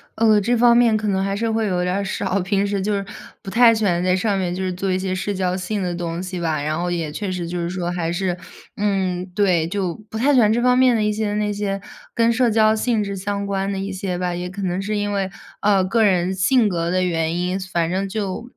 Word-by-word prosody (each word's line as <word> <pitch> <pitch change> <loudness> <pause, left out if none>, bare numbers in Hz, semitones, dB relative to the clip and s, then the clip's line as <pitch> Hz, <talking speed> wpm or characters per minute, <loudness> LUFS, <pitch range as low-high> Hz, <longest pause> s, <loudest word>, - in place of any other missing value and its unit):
呃， 220 -2 +4
这 240 +5 +1
方 235 0 +5
面 235 -2 +4
可 215 0 -3
能 190 -1 +1
还 195 0 -1
是 225 +2 -1
会 220 -1 0
有 180 -2 0
点 180 - 0
儿 200 - -1
少， 195 0 -1
平 195 +2 0
时 200 -1 -1
就 210 +2 -1
是 200 -1 -2 0.4
不 195 - -6
太 230 +1 +6
喜 215 -1 0
欢 175 -2 +1
在 185 0 +2
上 200 +1 0
面 180 -2 -1
就 190 - -3
是 185 -1 -2
做 190 +1 -2
一 185 - +1
些 185 0 -2
社 195 +2 -2
交 185 -1 -1
性 190 +3 -3
的 180 - -2
东 170 0 -4
西 185 -1 -5
吧。 160 -3 -1
然 155 +1 -1
后 175 +1 -1
也 165 -3 -2
确 200 +4 -4
实 180 -2 -3
就 175 0 -4
是 170 0 -2
说 175 -1 -3
还 170 -2 -2
是， 180 0 -1 0.4
嗯， 190 -3 0
对， 180 -6 +2
就 185 -1 -2 0.2
不 220 - -5
太 280 +6 +3
喜 255 - +5
欢 215 -2 +4
这 235 +2 +1
方 250 0 +4
面 255 -2 +5
的 215 - +1
一 210 - +1
些 210 -1 -2
那 210 0 0
些 200 -1 -2 0.4
跟 230 0 +3
社 250 -1 +2
交 220 0 +4
性 220 -1 0
质 200 -1 -4
相 200 +1 -3
关 195 0 -1
的 195 - -3
一 195 +1 -3
些 190 -1 -3
吧， 180 -1 -2
也 180 +1 -4
可 200 +1 -6
能 180 0 -1
是 210 +1 -2
因 205 0 -1
为， 195 -1 -1 0.3
呃， 200 -2 +3
个 225 +4 +2
人 185 -2 +2
性 220 +5 +3
格 170 -3 -1
的 185 +1 +1
原 165 -2 0
因。 180 +2 -1
反 170 -1 0
正 195 +1 -1
就 210 +3 -4
195 Hz, 290 characters per minute, -21 LUFS, 180-210 Hz, 0.4 s, 太